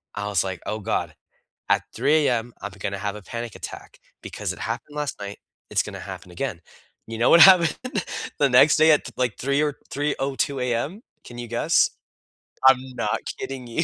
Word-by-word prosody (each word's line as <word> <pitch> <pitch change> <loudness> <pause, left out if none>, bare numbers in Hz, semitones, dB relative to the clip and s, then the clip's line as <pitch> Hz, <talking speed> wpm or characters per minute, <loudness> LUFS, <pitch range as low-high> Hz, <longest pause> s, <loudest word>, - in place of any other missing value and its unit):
I 105 0 -3
was 100 -4 +1
like, 95 -2 -5
"Oh 110 - -3
god. 90 -6 -2 0.5
At - - +3
3:00 150 0 +3
AM, 120 -1 -1
I'm 105 - -4
gonna 100 0 -4
have 105 0 -3
a 105 - -10
panic 115 +2 -6
attack, - - -9 0.2
because - - -4
it - - -12
happened 150 0 -5
last 150 -1 -3
night. 100 0 -7 0.3
It's - - +2
gonna - - -7
happen 90 - -9
again." 90 -5 -4 0.5
You 115 - -5
know 120 - +3
what 170 - +8
happened 180 -4 +7 0.6
the 140 - +4
next 125 +4 +6
day 155 0 +6
at, 150 - +3
like, 125 -4 0
3:00 140 +3 +1
or 145 -2 -1
3:02 140 -1 -1
AM? 125 - -2 0.2
Can 120 - -11
you 120 -1 -6
guess? 120 - +3 0.8
I'm 130 -1 +8 0.2
not - - -1 0.2
kidding 130 -2 -6
you. 140 +8 -1
125 Hz, 185 wpm, -24 LUFS, 105-145 Hz, 0.8 s, what